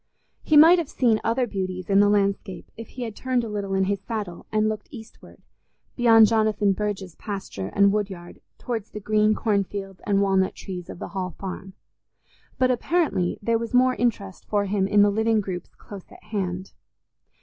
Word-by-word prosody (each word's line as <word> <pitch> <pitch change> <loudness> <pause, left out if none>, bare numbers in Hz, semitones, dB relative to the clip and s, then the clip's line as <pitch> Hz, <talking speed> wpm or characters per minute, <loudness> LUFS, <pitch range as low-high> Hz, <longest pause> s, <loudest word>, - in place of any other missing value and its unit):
He 310 - +3
might 330 +4 +8
have 330 - -3
seen 230 -4 +1
other 240 +3 +1
beauties 185 -4 -4
in 195 0 +4
the 205 0 +5
landscape 200 -2 -1
if 225 -1 -9
he 250 - -7
had 225 -3 -6
turned 255 -2 -1
a - - -4
little 200 -2 -3
in 190 - +2
his 200 0 -1
saddle 205 -6 -6
and 215 0 +2
looked 215 -1 -4
eastward, 225 -5 -13 0.5
beyond 225 -2 +6
Jonathan 215 -2 +2
Burge's 195 -3 -4
pasture 195 - -6
and 200 0 +4
woodyard 190 -4 -4 0.2
towards 230 -4 -4
the 210 - -7
green 215 +1 +2
corn 205 -3 +1
fields 195 -1 -8
and 200 -1 +2
walnut 190 -1 +1
trees 180 -2 -8
of - - -8
the - - -7
Hall 185 -4 -4
Farm; 190 0 -7 0.8
but 255 0 +3
apparently 260 - 0
there 230 +1 +1
was 230 +1 -4
more 255 +1 +4
interest 205 -7 -2
for 205 -1 0
him 195 -1 0
in 205 0 +4
the 205 - +3
living 220 +1 +1
groups 185 -3 -5
close 200 -3 -12
at - - -16
hand. 190 -3 -4
205 Hz, 185 wpm, -24 LUFS, 195-225 Hz, 0.8 s, might